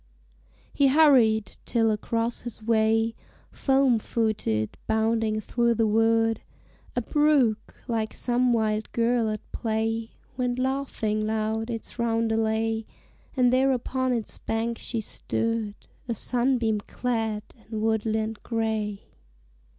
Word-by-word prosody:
He 280 - +4
hurried, 260 -8 +4
till 225 -2 +2
across 230 +2 -1
his 235 -2 -7
way, 225 0 +2 0.4
Foam 270 -4 +3
footed, 210 - -1
bounding 220 0 +1
through 235 +2 +1
the 225 0 +2
wood, 225 +1 +2 0.5
A 245 - 0
brook, 290 -6 +2
like 225 -3 -1
some 245 0 +1
wild 215 -2 0
girl 235 -1 +2
at 215 0 -3
play, 225 0 -1 0.3
Went 250 -1 0
laughing 255 -5 -1
loud 220 +1 -1
its 230 +1 -6
roundelay; 225 -1 0 0.5
And 250 -1 +4
there 265 +1 +4
upon 260 +1 -1
its 230 -3 -2
bank 230 +1 -2
she 230 -2 -3
stood, 225 0 -2 0.3
A 235 - -1
sunbeam 240 -2 +1
clad 225 -1 -2 0.3
in 220 -1 -3
woodland 220 0 0
gray. 220 -3 -2
225 Hz, 115 wpm, -26 LUFS, 220-240 Hz, 0.5 s, He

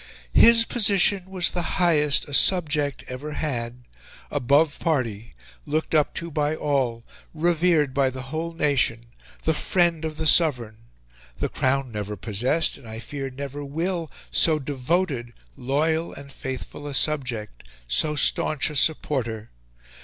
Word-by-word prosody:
"His 230 0 +7
position 200 -4 +3
was 185 -2 +2
the 175 - -2 0.2
highest 150 -5 +3
a 145 - -8
subject 150 -6 +3
ever 140 +4 -7
had 125 -5 -4 0.5
above 145 +3 +2
party 115 - -2 0.3
looked 155 +2 -2
up 150 -2 +2
to 170 0 -4
by 150 +1 -1
all 130 -7 -1 0.3
revered 165 -3 +1
by 135 -1 +2
the 130 0 -7
whole 160 +5 -5
nation 120 -7 0 0.3
the 160 - +1
friend 170 0 +1
of 155 -1 -5
the 160 - -3
Sovereign... 125 -10 +3 0.6
The - - -2
Crown 130 -1 -1
never 105 -1 -5
possessed 120 - 0
and 115 - -13
I 110 - -7
fear 135 +4 -6
never 140 +2 -7
WILL 165 +3 -3 0.2
so 160 -2 +4
DEVOTED, 140 -2 -2 0.2
loyal, 160 +5 -1
and 140 0 -11
faithful 130 +2 -7
a 140 - -4
subject, 125 - -1 0.3
so 150 - +1
staunch 150 +1 +1
a - - -8
supporter! 125 -7 0
145 Hz, 140 wpm, -24 LUFS, 125-160 Hz, 0.6 s, His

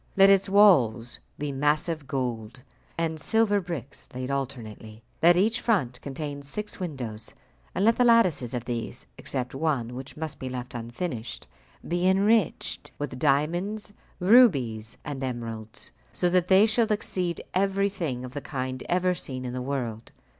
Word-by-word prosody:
Let 195 0 +8
its 195 0 +3
walls 130 - +4 0.2
be 145 0 -3
massive 150 +2 0
gold 125 -2 -4 0.3
and 160 -1 -1
silver 205 +5 +2
bricks 165 -7 -7
laid 130 +1 -3
alternately. 115 -5 -5 0.2
Let 175 +1 +6
each 220 +6 +2
front 135 - 0
contain 145 0 -5
six 205 +10 -5
windows, 125 - -5 0.4
and 195 - +1
let 230 +1 +4
the 250 - +4
lattices 180 - +3
of 120 -1 -4
these 120 -2 -4
(except 125 -2 -3
one, 135 -5 -1
which 130 +4 -8
must 160 -1 -5
be 130 - -4
left 125 0 -6
unfinished) 120 +1 -5 0.4
be 175 +1 +1
enriched 200 0 +2
with 135 -3 -5
diamonds, 175 +10 0 0.3
rubies, 140 - +4
and 140 -2 -5
emeralds, 115 -4 -6 0.2
so 180 - +1
that 180 0 +2
they 190 +3 +6
shall 220 0 +2
exceed 180 -4 -1
everything 190 -9 0
of 125 - -9
the 145 - -4
kind 130 -2 -4
ever 180 +1 +2
seen 130 -6 -6
in 125 - -4
the 130 - -3
world. 125 -4 -4
145 Hz, 150 wpm, -26 LUFS, 125-185 Hz, 0.4 s, Let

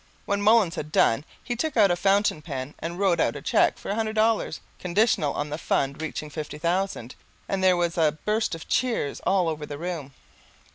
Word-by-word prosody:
When 200 -1 0
Mullins 210 -4 +4
had 150 -1 -6
done 115 +2 +3 0.2
he 240 - -3
took 280 +2 -2
out 200 -4 +6
a - - +3
fountain 195 -2 +2
pen 140 -3 -5
and 170 +2 -5
wrote 190 -3 +2
out - - +1
a - - -6
cheque - - +3
for - - -5
a - - +1
hundred 220 0 -2
dollars, 220 -6 +1 0.2
conditional 180 -5 +2
on 145 0 -3
the 150 - -3
fund 140 -1 -1
reaching 155 -1 -5
fifty 150 -1 -6
thousand. 170 -6 -1 0.3
And 195 -1 -1
there 185 -1 +5
was 170 -1 0
a 155 -2 +2
burst 215 -4 0
of 165 - -10
cheers 235 - 0
all 190 -3 +3
over 155 -2 -3
the 145 - -6
room. 160 -5 -5
175 Hz, 205 wpm, -25 LUFS, 150-205 Hz, 0.3 s, out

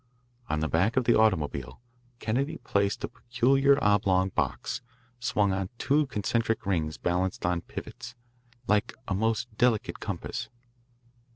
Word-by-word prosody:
On 75 - 0
the 80 - +1
back 90 - +1
of 130 - +4
the 120 0 +4
automobile 75 - +1 0.4
Kennedy 135 +8 -1
placed 100 -2 0
a - - 0
peculiar 130 +4 +3
oblong 95 -2 +3
box, 115 - -2 0.4
swung 105 -5 +1
on 95 -1 -2
two 145 +3 +2
concentric 115 0 -1
rings 80 -5 0
balanced 90 +1 -1
on 90 -1 +1
pivots, 125 - -8 0.5
like 105 -1 +1
a 95 - 0
most 110 +2 -1
delicate 120 -4 +2
compass. - - -4
105 Hz, 130 wpm, -28 LUFS, 95-120 Hz, 0.5 s, of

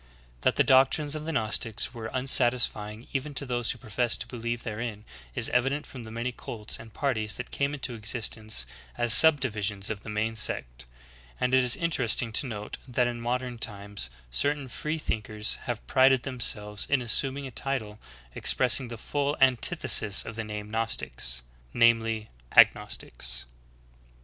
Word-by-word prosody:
^ - - -28
9. - - -27 0.3
That - - +2
the - - +4
doctrines 135 +3 +3
of 155 0 -5
the 165 - -3
Gnostics 115 -3 -1
were 115 -2 -6
unsatisfying 120 -4 +1
even 145 +1 -3
to 140 - -1
those 120 -2 -1
who - - -2
professed 115 +2 -1
to - - -2
believe 120 -1 -4
therein 110 -1 -5 0.3
is - - +3
evident 135 +4 0
from 125 -4 -10
the - - -9
many 115 +3 -3
cults 110 -3 -7
and 115 0 -12
parties 110 -5 -2
that 125 - -7
came 140 +1 -1
into 130 -3 -4
existence 110 - -1 0.3
as 120 -2 +4
subdivisions 110 -9 +5
of 105 -2 -5
the 110 - -10
main 110 +2 -2
sect; - - -2 0.5
and 125 0 0
it 130 0 +5
is 125 -1 +8
interesting 125 -8 0
to 135 - +2
note 105 -3 -7
that 125 -1 +1
in 120 -1 -4
modern 125 0 -3
times 100 - -4 0.2
certain 145 - 0
free 150 +6 -4
thinkers 110 -6 -3
have - - -4
prided 130 - +4
them 130 -2 -6
selves 105 -2 -1
in 140 - +3
assuming 135 +4 +1
a 130 - -7
title 115 -5 -3 0.3
expressing 125 0 +3
the 115 -1 -7
full 145 +5 -2
antithesis 115 -5 +3
of 115 - -7
the 115 - -4
name 105 -1 -7
Gnostics, 85 - 0 0.3
viz. 115 -2 +3 0.3
Agnostics. 60 0 +2
115 Hz, 165 wpm, -27 LUFS, 110-130 Hz, 0.5 s, is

